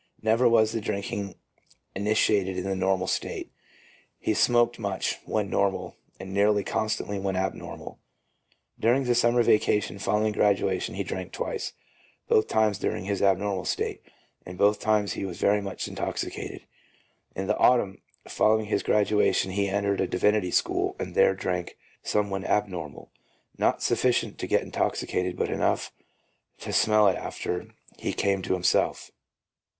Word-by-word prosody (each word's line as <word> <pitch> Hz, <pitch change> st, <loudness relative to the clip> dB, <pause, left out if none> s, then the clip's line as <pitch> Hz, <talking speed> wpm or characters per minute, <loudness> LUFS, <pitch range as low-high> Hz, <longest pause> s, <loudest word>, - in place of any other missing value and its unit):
Never 115 Hz, +3 st, +4 dB
was 110 Hz, -2 st, +4 dB
the 115 Hz, -1 st, -2 dB
drinking 100 Hz, -1 st, -3 dB, 0.6 s
initiated 100 Hz, -2 st, +1 dB
in 90 Hz, -, -2 dB
the 95 Hz, 0 st, -2 dB
normal 95 Hz, 0 st, +1 dB
state. -, -, -3 dB, 0.7 s
He -, -, -1 dB
smoked 120 Hz, +2 st, +3 dB
much 100 Hz, -3 st, -2 dB
when 105 Hz, -2 st, -1 dB
normal, 100 Hz, -1 st, 0 dB, 0.2 s
and 95 Hz, 0 st, -7 dB
nearly 105 Hz, +1 st, +3 dB
constantly 110 Hz, -2 st, -2 dB
when 95 Hz, -1 st, -2 dB
abnormal. 95 Hz, +1 st, -4 dB, 0.8 s
During 120 Hz, +5 st, +3 dB
the 125 Hz, -1 st, +2 dB
summer 120 Hz, 0 st, +3 dB
vacation 105 Hz, -3 st, +2 dB
following 105 Hz, +2 st, +1 dB
graduation 100 Hz, -3 st, +1 dB
he 100 Hz, -, -2 dB
drank 95 Hz, -1 st, -5 dB
twice, -, -, -4 dB, 0.5 s
both 110 Hz, -, +3 dB
times 105 Hz, -2 st, +1 dB
during -, -, -2 dB
his 100 Hz, 0 st, -2 dB
abnormal 95 Hz, -1 st, +1 dB
state, -, -, -2 dB, 0.4 s
and 90 Hz, 0 st, -9 dB
both 105 Hz, +2 st, +3 dB
times 105 Hz, -1 st, +1 dB
he -, -, -5 dB
was 95 Hz, -3 st, -5 dB
very 105 Hz, +1 st, +2 dB
much 100 Hz, -1 st, -5 dB
intoxicated. -, -, -5 dB, 0.7 s
In 95 Hz, -, -3 dB
the -, -, 0 dB
autumn 110 Hz, -6 st, +3 dB, 0.3 s
following 110 Hz, 0 st, +2 dB
his 105 Hz, -, 0 dB
graduation 105 Hz, -2 st, +2 dB
he 100 Hz, +1 st, 0 dB
entered 100 Hz, 0 st, 0 dB
a 95 Hz, -, +1 dB
divinity 105 Hz, +1 st, +1 dB
school -, -, 0 dB
and -, -, -5 dB
there 95 Hz, -, +4 dB
drank 90 Hz, -2 st, -3 dB, 0.2 s
some 105 Hz, -1 st, 0 dB
when 95 Hz, 0 st, -2 dB
abnormal, 90 Hz, -9 st, -2 dB, 0.4 s
not -, -, +1 dB
sufficient -, -, +1 dB
to -, -, -3 dB
get -, -, +2 dB
intoxicated, 90 Hz, 0 st, -2 dB
but -, -, -1 dB
enough -, -, 0 dB, 0.7 s
to -, -, -5 dB
smell 105 Hz, -1 st, +4 dB
it 95 Hz, -, +2 dB
after 90 Hz, -, -4 dB, 0.3 s
he -, -, -2 dB
came 100 Hz, -1 st, 0 dB
to 95 Hz, -, -1 dB
himself. 90 Hz, -1 st, +1 dB
100 Hz, 150 wpm, -26 LUFS, 95-105 Hz, 0.8 s, Never